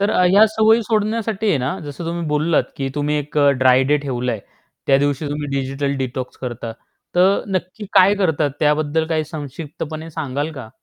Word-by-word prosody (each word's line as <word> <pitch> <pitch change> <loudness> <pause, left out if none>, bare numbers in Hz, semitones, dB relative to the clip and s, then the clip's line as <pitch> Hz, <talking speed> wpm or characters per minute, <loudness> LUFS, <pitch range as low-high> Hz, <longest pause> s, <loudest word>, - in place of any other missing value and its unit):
तर 200 +1 +2
अ, 180 - +3
ह्या 205 +3 +7
सवयी 220 +1 +3
सोडण्यासाठी 220 0 -1
आहे 160 - +3
ना 130 +9 -2
जसं 145 +3 -7
तुम्ही 170 0 -3
बोललात 150 +2 +2
की 135 -1 -2
तुम्ही 150 0 0
एक 150 +1 -3
अ, 145 -1 +5
ड्राय 130 0 +6
डे 145 +3 +3
ठेवलंय 125 -4 -2 0.5
त्या 135 - +5
दिवशी 145 +1 0
तुम्ही 145 0 -3
डिजिटल 135 +1 -2
डिटॉक्स 130 0 -5
करता 120 -2 -5 0.4
तर 185 +3 +4
नक्की 185 +4 -4
काय 195 +1 +6
करतात, 160 -7 +1
त्याबद्दल 155 +1 +1
काही 160 -1 0
संक्षिप्तपणे 155 +1 -7
सांगाल 145 -1 -3
का? 130 -7 -8
150 Hz, 175 wpm, -20 LUFS, 140-180 Hz, 0.5 s, ह्या